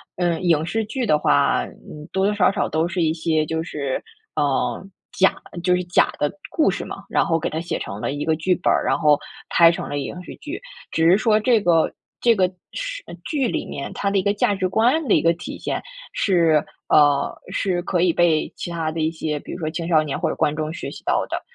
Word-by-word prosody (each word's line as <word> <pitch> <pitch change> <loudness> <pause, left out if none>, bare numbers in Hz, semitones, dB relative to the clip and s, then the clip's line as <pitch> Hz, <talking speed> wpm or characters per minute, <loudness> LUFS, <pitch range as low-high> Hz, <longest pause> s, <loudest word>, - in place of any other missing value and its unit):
嗯， 175 -2 0
影 165 -4 +2
视 220 +5 -1
剧 255 +3 -3
的 150 -8 +3
话， 140 -1 +3
嗯， 150 +1 -12
多 190 0 +2
多 210 - +2
少 205 -3 +4
少 - - -1
都 160 +2 +1
是 180 0 -2
一 160 -1 +2
些 160 -1 0
就 160 +1 -2
是， 140 -5 -3 0.4
嗯， 140 +3 0 0.2
假 190 - +3 0.3
就 180 -1 +4
是 180 - -1
假 175 - +3
的 145 - 0 0.2
故 315 - +2
事 - - -4
嘛， - - -8
然 - - +2
后 165 - +2
给 165 - -2
它 160 - -3
写 170 - -3
成 100 +1 -6
了 140 - -2
一 145 +1 -3
个 160 0 +1
剧 180 +3 +1
本 175 - +1
儿， - - +1
然 - - +2
后 150 -1 +4 0.3
拍 170 -1 +6
成 165 - -3
了 145 - -3
影 180 +6 -5
视 - - -9
剧。 335 +9 -7 0.3
只 165 +1 +3
是 190 - +6
说 215 0 +3
这 235 0 +4
个 170 -5 +2 0.3
这 235 -1 +5
个 185 -1 +3 0.2
时 - - -5 0.2
剧 275 -6 0
里 - - -2
面， 140 - -6
它 200 - -1
的 200 - +1
一 190 - +2
个 200 - +2
价 205 0 +1
值 185 -1 -1
观 245 - +2
的 - - +5
一 - - +4
个 165 - +4
体 175 - -7
现 - - -3 0.3
是 165 -6 +3 0.3
呃， 145 -2 +4 0.2
是 180 -3 0
可 180 -2 0
以 180 -1 +4
被 165 -2 +2
其 - - -5
他 165 -2 -2
的 160 - -5
一 155 0 +2
些， 155 -2 -3
比 - - -10
如 - - -6
说 155 - -2
青 165 +1 -4
少 155 -3 +4
年 145 -3 -3
或 - - 0
者 - - -3
观 150 - +1
众 155 0 -3
学 - - -6
习 - - -10
到 - - +1
的。 - - -3
170 Hz, 260 characters per minute, -22 LUFS, 155-190 Hz, 0.4 s, 拍